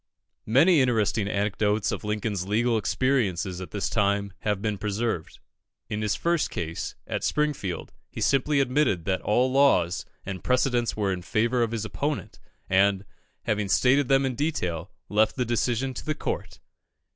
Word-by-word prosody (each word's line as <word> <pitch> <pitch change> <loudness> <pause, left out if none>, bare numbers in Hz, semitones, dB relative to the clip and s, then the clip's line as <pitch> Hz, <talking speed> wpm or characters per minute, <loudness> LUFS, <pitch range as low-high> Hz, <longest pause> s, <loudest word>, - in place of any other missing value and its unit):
Many 145 - +5
interesting 110 -4 +1
anecdotes 105 0 0
of - - -4
Lincoln's 105 -3 -2
legal 115 +3 +2
experiences 100 -5 0
at 90 - -7
this 95 +2 -2
time 100 -1 0
have 105 -1 -1
been 105 -1 -2
preserved. 105 -3 -2 0.5
In 105 0 -2
his 105 -1 0
first 170 -2 0
case, 80 -1 -4
at - - -3
Springfield, 145 - -1 0.2
he - - -8
simply 140 +1 +2
admitted 125 - +1
that 95 -1 0
all 125 +5 +2
laws 100 -10 +3 0.2
and 95 -3 -6
precedents 125 -2 +1
were 100 -3 +1
in 90 - -5
favour 115 +6 +1
of 115 - +2
his 110 -1 -3
opponent, 145 +6 -3 0.3
and, 95 +1 +3 0.4
having 105 -2 -1
stated 135 +6 +4
them 135 0 +3
in 130 - -1
detail, 95 - -2 0.2
left 105 +1 +2
the 125 - 0
decision 120 +2 0
to - - -7
the 155 0 -2
Court. - - -4
110 Hz, 155 wpm, -26 LUFS, 100-130 Hz, 0.5 s, Many